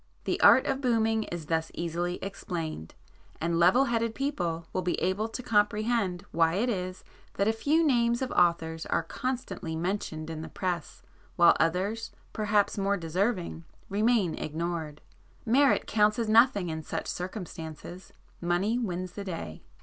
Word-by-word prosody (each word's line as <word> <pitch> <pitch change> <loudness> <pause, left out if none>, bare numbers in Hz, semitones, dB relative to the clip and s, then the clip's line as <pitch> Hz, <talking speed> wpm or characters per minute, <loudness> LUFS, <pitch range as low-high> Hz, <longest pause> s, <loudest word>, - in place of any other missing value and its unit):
The - - -1
art 260 - +7
of 270 0 -1
'booming' 225 -3 +2
is 170 -2 -6
thus 160 +1 -1
easily 175 +1 -2
explained, 165 - -5 0.4
and 165 +1 0
level 185 +10 +5
headed 230 -2 0
people 175 - -2
will 185 - 0
be 180 -1 -1
able 200 +5 0
to 250 +3 -6
comprehend 210 -3 +1
why 165 0 +2
it 235 +6 +1
is 185 -4 -3 0.3
that 200 - +1
a 220 - +3
few 305 +8 +2
names 235 -3 +2
of 255 - -3
authors 165 -2 +1
are 165 - +1
constantly 250 -5 -4
mentioned 165 -2 -3
in 155 -1 -5
the - - -7
press, 175 -4 -4 0.3
while 170 -1 +6
others, 195 +7 0 0.2
perhaps 210 -1 +1
more 200 +1 +1
deserving, 175 0 -1 0.3
remain 210 -3 +2
ignored. 160 -1 -4 0.4
Merit 270 +4 +4
counts 210 -1 +3
as 230 -2 -1
nothing 215 -4 +4
in 160 0 -3
such - - -4
circumstances,—money 180 +2 -4
wins 185 -5 -3
the 200 +2 -6
day. 165 - -6
185 Hz, 150 wpm, -28 LUFS, 170-225 Hz, 0.4 s, art